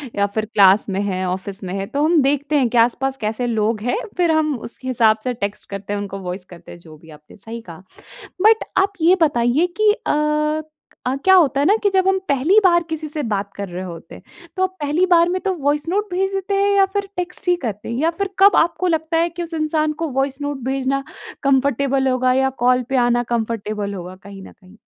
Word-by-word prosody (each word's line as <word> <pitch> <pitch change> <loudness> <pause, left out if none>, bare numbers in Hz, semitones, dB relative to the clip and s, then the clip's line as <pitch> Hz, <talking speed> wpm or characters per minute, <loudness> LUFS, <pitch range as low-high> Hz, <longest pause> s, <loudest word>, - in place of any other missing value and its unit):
या 200 - +2
फ़िर 220 -1 0
क्लास 195 0 +5
में 195 0 -1
है 190 -2 -2
ऑफिस 190 +2 -5
में 185 -1 -5
है, 195 - -3
तो 285 +8 -2
हम 325 -2 +4
देखते 285 +2 0
हैं 255 -4 +2
कि 240 - -1
आस-पास 255 +3 +2
कैसे 220 +3 -2
लोग 220 -1 0
हैं। 245 +2 -1 0.2
फ़िर 345 -2 +3
हम 305 -2 +1
उस 235 - -10
हिसाब 230 -4 +3
से 250 -1 -1
टेक्स्ट 205 -2 -5
करते 200 +1 -5
हैं 205 - -2
उनको 195 -1 -6
वॉइस 180 0 -6
करते 175 -2 -14
हैं 175 - -11
जो 160 -2 -15
भी 160 +1 -18
आपने 150 0 -15
सही 225 +3 -8
कहा। 170 +3 -11 0.6
बट 440 +2 +5
आप 390 +1 +2
ये 345 +4 +5
बताइए 275 +2 +2
कि 430 -1 +5
अ, 300 -5 0 0.6
क्या 380 - +5
होता 295 -6 +4
है 285 - +2
ना 405 - +5
कि 405 - +4
जब 380 -1 +1
हम 385 0 +3
पहली 290 +10 +4
बार 345 -2 +4
किसी 320 -1 -4
से 300 0 -4
बात 200 0 -3
कर 200 0 -5
रहे 180 +1 -6
होते 165 -2 -9
हैं। - - -13 0.4
तो 375 - +1
आप 375 0 -2
पहली 300 +5 +1
बार 340 0 +5
में 370 +1 -1
तो 385 -2 -1
वॉइस 290 +3 0
नोट 410 +3 -1
भेज 385 +2 -1
देते 390 +1 -2
हैं 400 +1 +2
या 395 -1 +5
फ़िर 400 +1 -3
टेक्स्ट 360 +1 -5
ही 355 - +4
करते 210 -4 -5
हैं? 235 - -3
या 325 - +3
फ़िर 390 +3 -3
कब 400 +1 +6
आपको 350 +2 +2
लगता 320 0 0
है 335 +1 +2
कि 345 +1 -6
उस 335 - -8
इंसान 310 -1 0
को 330 - 0
वॉइस 270 +1 -2
नोट 285 -1 -3
भेजना 270 +1 -1 0.4
कंफ़र्टेबल 275 0 +1
होगा 255 0 +2
या 265 +1 +2 0.2
कॉल 250 0 +3
पे 270 - -1
आना 240 0 +1
कंफ़र्टेबल 215 -3 -3
होगा 185 0 -7
कहीं 200 -1 -11
न - - -12
कहीं? 195 +2 -20
270 Hz, 235 wpm, -20 LUFS, 210-335 Hz, 0.6 s, कब